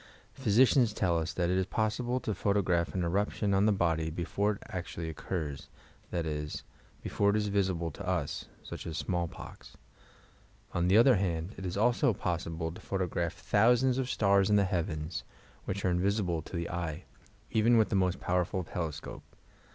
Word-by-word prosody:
Physi 110 +5 +4
cians 120 -4 +3
tell 85 -4 +2
us 80 0 -2
that 90 -1 0
it 95 - +2
is 95 - 0
possible 120 +4 0
to 110 - -2
photograph 90 -5 +1
an 90 - 0
eruption 100 +3 0
on 100 +2 +4
the - - +5
body 80 -5 +1
before 100 +6 -1
it 100 - -11
actually 85 -2 -5
occurs, 75 -3 -4 0.4
that 85 -2 -2
is, 75 -1 -4 0.4
before 100 - +1
it 100 - +2
iB 105 -1 0
visible 90 -5 0
to - - -8
us - - -1 0.2
(such - - -7
as 80 - -4
smallpox). 85 -2 -4 1.0
On 85 0 +1
the 95 +3 +5
other 120 0 +6
hand, 90 0 -2
it 95 - -5
is 90 - -4
also 120 0 +3
possible 80 -2 -2
to 85 - -11
photograph 90 -3 -2
thousands 125 +4 +3
of 130 -1 -1
stars 100 -4 +3
in 105 - +4
the 100 - +5
heavens, 80 -3 -2 0.4
which 100 +1 -3
are 90 - +3
invisible 90 -2 +1
to 85 - -9
the 85 0 -3
eye, 85 -1 -3 0.5
even 115 +2 +4
with 110 - +4
the - - 0
most 95 -1 +1
powerful 90 +1 0
telescope. 80 -2 -5
95 Hz, 175 wpm, -31 LUFS, 85-105 Hz, 1.0 s, other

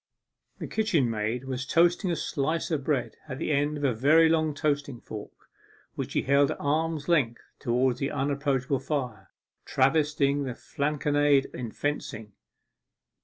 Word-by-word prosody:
The - - -5
kitchen 210 - +1
maid 110 +4 -2
was 130 -1 -3
toasting 175 +7 +2
a 170 - +1
slice 155 +3 -2
of 150 -4 -1
bread 130 -7 -1
at 130 - -4
the 155 - -2
end 145 +1 +1
of 145 - -6
a 135 -3 +2
very 155 +8 +5
long 155 -2 +1
toasting 145 -4 -1
fork, 105 -2 -10 0.5
which - - -5
she - - +1
held 140 +1 +4
at - - -3
arm's 155 +1 -1
length 140 -9 +1 0.2
towards 125 0 +1
the 140 - -1
unapproachable 140 -2 0
fire, 125 -8 -4 0.3
travestying 145 0 +2
the 125 -2 -4
Flanconnade 145 -1 +1
in 120 -3 -5
fencing. 110 -8 -4
140 Hz, 150 wpm, -27 LUFS, 130-150 Hz, 0.5 s, very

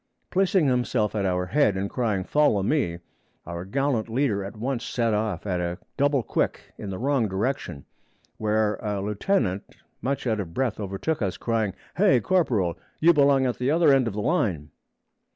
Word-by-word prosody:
Placing 190 -3 +3
himself 125 -5 +1
at 100 -3 0
our 90 0 0
head 105 -1 +2
and 100 +1 -1
crying, 105 -5 -1
'Follow 145 -6 +2
me,' 100 - 0 0.5
our 85 +1 -5
gallant 130 0 -1
leader 115 -5 0
at 100 +3 -8
once 125 +1 -2
set 115 -2 0
off 105 -4 -1
at 90 -3 -1
a 85 0 -2 0.2
double 140 -2 +2
quick - - -2
in 100 - -6
the 95 - -4
wrong 130 -1 +1
direction, 95 - -3 0.5
where 110 0 +1
a 105 -2 -3
lieutenant 105 - -1 0.3
much 135 +1 -2
out 110 -3 0
of 85 -4 -6
breath 125 -6 -1
overtook 100 +10 -2
us, 95 -3 -1
crying, 110 -4 -1 0.2
'Hay, 185 -9 +5
corporal! 110 - +1 0.2
you 170 +2 +6
belong 140 -3 +4
at 125 - -1
the 125 +2 0
other 160 -1 +5
end 130 -3 +3
of 105 - -3
the 105 - -2
line!' 90 - 0
110 Hz, 175 wpm, -25 LUFS, 100-135 Hz, 0.5 s, you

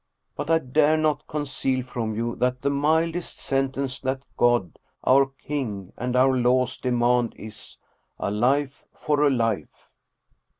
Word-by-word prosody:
But 145 - -5
I 165 - +5
dare 155 +2 +2
not 155 -2 0
conceal 135 -3 -2
from 115 -3 -4
you 115 +1 -2
that 125 +1 0
the 140 - +2
mildest 160 +4 0
sentence 135 0 -1
that 130 0 -2
God, 120 -8 +2 0.2
our 135 +1 +5
king, 135 -8 -5
and 125 +1 -3
our 130 +1 +4
laws 125 0 +2
demand 120 -1 +1
is, 105 0 -10 0.4
a - - -2
life 135 +6 0
for 150 -1 0
a 150 - +5
life." 115 - -2
130 Hz, 140 wpm, -25 LUFS, 120-145 Hz, 0.4 s, I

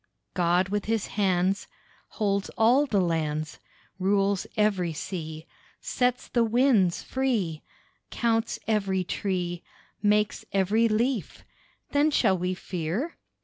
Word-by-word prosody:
God 180 +1 +2
with 205 0 -1
His 225 -2 0
hands 190 0 +1 0.5
Holds 200 -2 0
all 250 +6 +4
the 205 -6 +1
lands; 155 -3 -1 0.4
Rules 195 0 +1
every 195 -6 +1
sea, 160 -1 -6 0.3
Sets 250 -1 0
the 235 - +2
winds 230 -6 +3
free, 220 -12 -1 0.5
Counts 225 -1 0
every 195 -4 +1
tree, 180 -2 -2 0.4
Makes 210 0 +2
every 200 +4 +3
leaf. 230 +1 -1 0.5
Then 290 +2 +3
shall 220 -9 +3
we 180 +1 -2
fear? 180 - -3
200 Hz, 110 wpm, -27 LUFS, 180-225 Hz, 0.5 s, all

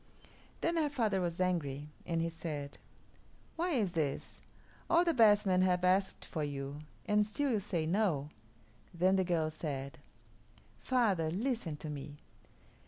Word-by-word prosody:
Then 335 0 +1
her 305 -2 +2
father 220 -9 +1
was 175 -1 -2
angry, 150 -6 -1 0.2
and 165 -1 0
he 165 - 0
said, 155 -4 -6 0.8
"Why 345 +1 0
is 215 -9 +1
this? 150 -5 -3 0.5
All 340 +1 +5
the 335 -1 +2
best 210 -4 +6
men 185 -1 +3
have 180 -1 +2
asked 190 +1 +2
for 155 - -3
you, 140 0 -4 0.3
and 210 0 +3
still 260 +7 -1
you 220 - +2
say 180 -5 -2
'No.'" 165 -6 +1 0.7
Then 185 +3 +3
the 190 - +3
girl 165 -3 0
said, 140 -3 -5 0.8
"Father, 205 -11 +2
listen 200 - -2
to 155 - -6
me. 145 0 -7
180 Hz, 150 wpm, -33 LUFS, 155-210 Hz, 0.8 s, best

